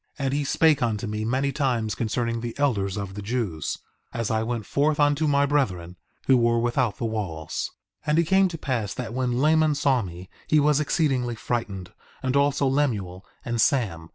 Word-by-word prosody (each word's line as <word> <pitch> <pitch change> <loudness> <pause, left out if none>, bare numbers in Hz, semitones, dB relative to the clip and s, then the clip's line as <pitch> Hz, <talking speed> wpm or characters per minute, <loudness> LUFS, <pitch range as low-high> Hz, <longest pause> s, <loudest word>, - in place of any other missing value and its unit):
4:27 140 - -3
And 135 - 0
he 145 +1 0
spake 150 +1 +3
unto 115 -2 0
me 105 0 -3
many 130 +4 0
times 125 -7 0
concerning 115 0 -2
the 120 -1 -5
elders 105 -9 0
of 100 -2 -4
the 105 - -6
Jews, 100 - -2 0.3
as 115 -1 -2
I 110 0 +1
went 115 -1 -3
forth 150 +1 +1
unto 145 +1 +3
my 140 -1 +3
brethren, 95 -12 -1 0.3
who 130 - +5
were 115 -1 +3
without 120 -1 0
the - - -3
walls. 95 -9 -3 0.4
4:28 - - 0
And 150 - +3
it 170 - +5
came 190 +3 +4
to 170 -2 -6
pass 125 -9 -2
that 120 -2 -5
when 125 -1 0
Laman 155 +1 +3
saw 140 -3 +2
me 90 -2 -8 0.2
he 155 - +4
was 150 0 +3
exceedingly 135 -6 0
frightened, 105 -5 -4 0.3
and 130 +1 0
also 140 0 +2
Lemuel 110 -10 0 0.2
and 120 -1 0
Sam. 90 - +1
120 Hz, 195 wpm, -25 LUFS, 105-140 Hz, 0.4 s, who